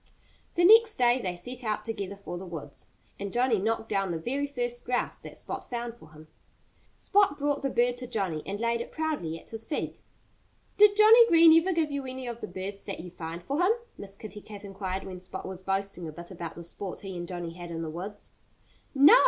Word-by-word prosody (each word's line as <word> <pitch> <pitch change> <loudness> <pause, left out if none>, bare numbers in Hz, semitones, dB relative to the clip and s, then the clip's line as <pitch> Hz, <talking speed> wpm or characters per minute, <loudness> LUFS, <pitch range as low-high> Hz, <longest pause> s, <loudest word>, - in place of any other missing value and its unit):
The 345 - +3
next 445 +2 +8
day 245 0 +4
they 180 -4 -2
set 245 +8 -6
out 215 -1 -1
together 200 -3 -4
for 195 -3 -7
the 190 - -7
woods. 150 -5 -6 0.3
And 200 0 -4
Johnnie 245 -2 +2
knocked 220 +1 0
down 195 -1 0
the 170 - -1
very 270 - -1
first 245 -3 -3
grouse 250 0 -1
that - - -10
Spot - - -5
found 240 -1 -3
for 160 - -16
him. 155 +1 -14 0.7
Spot 400 -8 +3
brought 290 0 0
the 275 - 0
bird 245 -1 +2
to 250 0 -6
Johnnie 185 -9 -1
and 200 +1 -3
laid 235 0 +1
it - - -7
proudly 300 - -2
at - - -15
his 225 0 -5
feet. 300 - -4 0.7
"Did 415 0 +7
Johnnie 450 +2 +9
Green 330 -4 +8
ever 375 +3 0
give 325 -4 +1
you 280 -2 -3
any 260 0 -5
of 235 -1 -5
the - - -4
birds 190 +3 -5
that - - -4
you 180 0 -9
find 165 0 -6
for 280 - -1
him?" 375 +5 +5 0.2
Miss 195 -1 -7
Kitty 210 0 -8
Cat 205 -1 -10
inquired 195 -1 -4
when 185 -1 -7
Spot 185 +1 -5
was 190 -1 -7
boasting 195 -2 -2
a - - -5
bit 170 +3 -10
about 170 -2 -6
the 170 - -8
sport 180 +2 -6
he 195 -2 -6
and 175 0 -5
Johnnie 175 -2 -5
had 175 0 -8
in 165 -1 -4
the 160 - -4
woods. 190 +6 -7 0.6
"No!" 285 - +9
210 Hz, 225 wpm, -29 LUFS, 180-260 Hz, 0.7 s, Johnnie